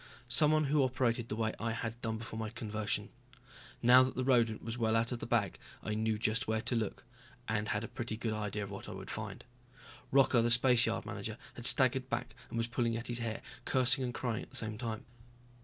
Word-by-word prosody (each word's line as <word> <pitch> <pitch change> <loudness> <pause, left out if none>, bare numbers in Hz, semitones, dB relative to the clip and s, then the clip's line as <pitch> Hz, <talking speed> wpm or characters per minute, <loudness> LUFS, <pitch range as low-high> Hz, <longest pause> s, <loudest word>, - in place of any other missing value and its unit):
Someone 155 0 +5
who 145 +1 +2
operated 125 -3 0
the 105 - -2
way 110 -1 -1
I 115 0 -1
had 115 +1 -5
done 110 -1 -2
before 110 0 -7
my 110 -1 -3
conversion. 110 -1 -3 0.7
Now 125 +2 +8
that 130 0 0
the 130 - -1
rodent 120 -4 +2
was 115 0 -4
well 115 -2 +1
out 115 +2 +1
of 120 - -3
the - - -6
bag 110 -6 0 0.2
I 110 - -2
knew 110 0 0
just 110 +1 0
where 110 0 +1
to 120 +2 -1
look, 110 -3 -2 0.4
and 105 0 -1
had 105 +1 -1
a - - -4
pretty 115 -2 -5
good 115 -1 -2
idea 105 -1 -3
of 100 - -7
what 100 - -7
I - - -6
would - - -8
find. - - -6 0.7
Rocca, 135 -3 +5
the 120 - +2
spaceyard 120 0 +4
manager, - - -5 0.2
had - - +3
staggered - - +4
back - - -3 0.2
and - - -5
was 115 - +1
pulling 115 -1 -1
at 115 - -6
his 120 0 -2
hair, 115 -2 -4 0.2
cursing 130 0 +3
and 125 - -1
crying 120 -2 -2
at - - -11
the 130 - -9
same 110 -3 -1
time. 115 -3 -4
115 Hz, 225 wpm, -33 LUFS, 110-125 Hz, 0.7 s, Now